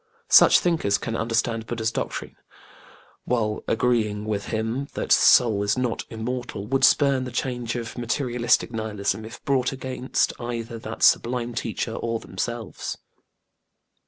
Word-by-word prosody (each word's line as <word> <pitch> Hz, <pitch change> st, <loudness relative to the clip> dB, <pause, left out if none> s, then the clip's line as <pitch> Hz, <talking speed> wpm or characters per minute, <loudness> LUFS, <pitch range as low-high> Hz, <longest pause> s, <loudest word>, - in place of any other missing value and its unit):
Such -, -, +8 dB
thinkers 160 Hz, -, +1 dB
can 115 Hz, -, -4 dB
understand 115 Hz, 0 st, -1 dB
BudĖĢdĖĢha's 115 Hz, -2 st, -1 dB
doctrine -, -, -4 dB
and, -, -, -33 dB, 0.9 s
while 110 Hz, -3 st, -1 dB
agreeing 110 Hz, -3 st, +1 dB
with 105 Hz, -2 st, -2 dB
him 115 Hz, +5 st, -2 dB
that -, -, -3 dB
soul 110 Hz, -5 st, +5 dB
is 100 Hz, +4 st, +1 dB
not 125 Hz, -2 st, -1 dB
immortal, 120 Hz, -2 st, -4 dB
would 135 Hz, +4 st, 0 dB
spurn 140 Hz, -3 st, +4 dB
the 125 Hz, -, -6 dB
charge 120 Hz, -1 st, -3 dB
of 120 Hz, 0 st, -5 dB
materialistic 120 Hz, 0 st, +1 dB
nihilism, 110 Hz, -1 st, -2 dB
if 115 Hz, +1 st, -11 dB
brought 130 Hz, -3 st, +1 dB
against 130 Hz, -1 st, -1 dB
either 120 Hz, -1 st, -5 dB
that 110 Hz, 0 st, -6 dB
sublime 120 Hz, 0 st, +3 dB
teacher 115 Hz, 0 st, -3 dB
or 115 Hz, 0 st, -2 dB
themselves. 120 Hz, 0 st, -5 dB
115 Hz, 135 wpm, -24 LUFS, 110-125 Hz, 0.9 s, Such